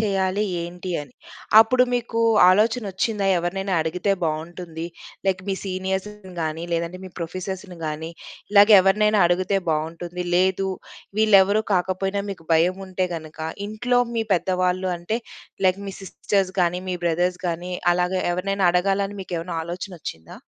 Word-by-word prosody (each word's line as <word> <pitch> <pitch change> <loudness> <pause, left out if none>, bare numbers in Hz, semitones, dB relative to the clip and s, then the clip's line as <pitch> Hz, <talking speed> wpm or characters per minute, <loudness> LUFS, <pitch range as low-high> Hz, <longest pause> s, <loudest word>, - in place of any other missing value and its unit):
చేయాలి? 195 -1 +1 0.2
ఏంటి? 180 +2 -6
అని 140 -4 -15 0.5
అప్పుడు 250 +3 +4
మీకు 230 -1 -1 0.3
ఆలోచన 220 +5 +3
వచ్చిందా? 200 +1 -1
ఎవరినైనా 190 +2 -2
అడిగితే 180 +5 0
బావుంటుంది. 165 +1 -4 0.4
లైక్ 185 -1 +1
మీ 195 - +1
సీనియర్స్‌ని 190 +1 -4
గాని, 160 +1 -3
లేదంటే 170 +2 -2
మీ 185 - -9
ప్రొఫెసర్స్‌ని 185 +1 -5
గాని, 155 +2 -4 0.4
ఇలాగ 205 +1 +7
ఎవరినైనా 210 +2 +3
అడిగితే 185 +2 +1
బావుంటుంది 170 +3 -3
లేదు. 190 +1 +2 0.5
వీళ్ళేవరు 210 0 +5
కాకపోయినా 190 +2 0
మీకు 165 -5 -9
భయం 175 +3 +3
ఉంటే 185 0 -1
గనక 160 -1 -8 0.3
ఇంట్లో 245 +3 +1
మీ 225 -1 0
పెద్దవాళ్ళు 185 +1 0
అంటే 195 +7 -2 0.5
లైక్ 185 +1 +2
మీ 195 - -6
సిస్టర్స్ 195 0 -1
గాని, 175 +1 +1
మీ 180 - -1
బ్రదర్స్ 180 +2 0
గాని 175 +2 -4 0.2
అలాగే 180 +1 0
ఎవరినైనా 195 +1 0
అడగాలని 195 +2 +1
మీకు 180 - -6
ఏమైనా 170 0 -5
ఆలోచన 180 +3 -6
వచ్చిందా? 80 - -8
185 Hz, 135 wpm, -23 LUFS, 175-195 Hz, 0.5 s, ఇలాగ